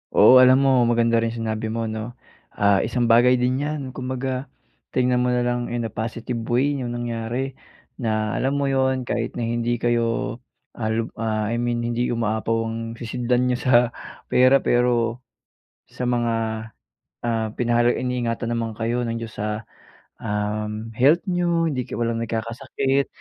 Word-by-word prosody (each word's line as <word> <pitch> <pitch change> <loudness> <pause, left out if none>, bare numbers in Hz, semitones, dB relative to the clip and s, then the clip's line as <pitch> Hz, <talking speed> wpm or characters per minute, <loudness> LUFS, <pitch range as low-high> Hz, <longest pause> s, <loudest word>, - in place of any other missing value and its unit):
Oo - - +8
alam 130 0 +7
mo 135 - +5 0.2
maganda 115 0 +3
rin 115 - 0
yung 115 0 -6
sinabi 110 0 -2
mo 115 - -1
'no. 110 - -4 0.6
Ah, 100 -1 +4
isang 120 +1 0
bagay 120 +2 +6
din 130 +2 +1
yan, 150 +1 -2 0.2
kumbaga 130 0 -3 0.4
tingnan 125 -1 +2
mo 125 - +1
na 125 0 +1
lang 120 0 -1
in 120 -1 -2
a 110 - -4
positive 115 +1 -3
way 130 +4 +2
yung 120 -1 -3
nangyari, 120 +3 -3 0.5
na 110 -2 0
alam 135 +2 0
mo 140 - 0
yun 130 -1 +1
kahit 120 -1 -3
na 120 - -1
hindi 120 +1 0
kayo, 115 -1 0 0.4
ah 110 -2 -3 0.3
ah, 110 -1 0
I 120 - -1
mean 120 -1 -1
hindi 120 +1 -1
umaapaw 115 -1 0
ang 115 0 -3 0.2
sisidlan 125 +1 -1
niyo 125 -1 +1
sa - - +4 0.5
pera. 130 +2 +5
Pero, 120 -1 +2 0.7
sa 125 - -4
mga, 120 -1 +1 0.9
ah, 115 -2 -1
pinahalag 120 0 +2
iniingatan 120 -2 -2
naman 115 -1 -2
kayo 120 +2 -1
ng 115 0 -3
Diyos 115 -1 -8
sa 105 +1 -2 0.6
um, 105 +1 -3
health 145 +9 +4
niyo, 170 -2 +1
hindi 130 -4 -2
ka - - -8
walang 115 -1 0
nagkakasakit. 130 +4 -1
120 Hz, 160 wpm, -23 LUFS, 115-125 Hz, 0.9 s, Oo